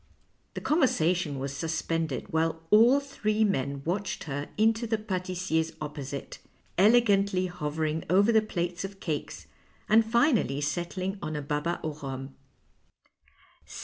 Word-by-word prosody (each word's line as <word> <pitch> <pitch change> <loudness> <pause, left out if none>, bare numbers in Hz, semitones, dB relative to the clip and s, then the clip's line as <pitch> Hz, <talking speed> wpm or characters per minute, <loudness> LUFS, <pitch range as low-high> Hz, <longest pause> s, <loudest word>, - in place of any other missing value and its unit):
The - - -4
conversation 180 - +1
was 135 +1 -4
suspended 160 -2 -2
while 160 0 0
all 235 +6 +7
three 220 -6 -1
men 140 -8 -1
watched 195 +5 -2
her 145 -1 -4
into 225 +2 +2
the 225 0 +1
patissier's 185 -5 -2
opposite, 145 -2 -6 0.4
elegantly 200 -3 +4
hovering 155 -2 -2
over 200 +5 +5
the 220 -1 +5
plates 175 -4 -3
of 195 0 -7
cakes, 155 -6 -4 0.4
and 220 +2 +6
finally 225 - +2
settling 175 +6 -3
on 155 -4 -4
a 150 - -2
baba 150 +4 -1
an 155 - -1
rhum. 135 -1 -5
175 Hz, 125 wpm, -28 LUFS, 150-210 Hz, 0.4 s, all